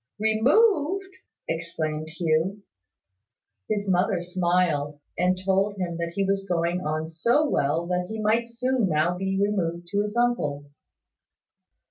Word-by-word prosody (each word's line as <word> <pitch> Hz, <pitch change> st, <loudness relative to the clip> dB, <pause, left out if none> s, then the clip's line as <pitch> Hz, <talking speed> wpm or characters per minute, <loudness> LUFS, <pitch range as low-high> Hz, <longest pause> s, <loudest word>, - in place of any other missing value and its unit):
"Removed!" 305 Hz, -, +2 dB, 0.4 s
exclaimed 160 Hz, -1 st, -3 dB
Hugh. 165 Hz, +5 st, 0 dB, 1.1 s
His 205 Hz, -1 st, -1 dB
mother 180 Hz, -1 st, +1 dB
smiled, 175 Hz, -5 st, 0 dB, 0.2 s
and 180 Hz, +1 st, +2 dB
told 195 Hz, +2 st, +1 dB
him 175 Hz, -3 st, -3 dB
that 170 Hz, 0 st, -3 dB
he 200 Hz, -, +1 dB
was 195 Hz, 0 st, -1 dB
going 170 Hz, +1 st, 0 dB
on 155 Hz, +1 st, -2 dB
so 235 Hz, -, +2 dB
well 160 Hz, -, +1 dB
that 180 Hz, 0 st, -1 dB
he 220 Hz, 0 st, -5 dB
might 225 Hz, +2 st, +1 dB
soon 245 Hz, -2 st, 0 dB
now 155 Hz, +3 st, +2 dB
be 195 Hz, +1 st, -1 dB
removed 175 Hz, -4 st, 0 dB
to 205 Hz, -, +2 dB
his 210 Hz, +2 st, -3 dB
uncle's. 145 Hz, -13 st, -1 dB
185 Hz, 130 wpm, -25 LUFS, 165-210 Hz, 1.1 s, Removed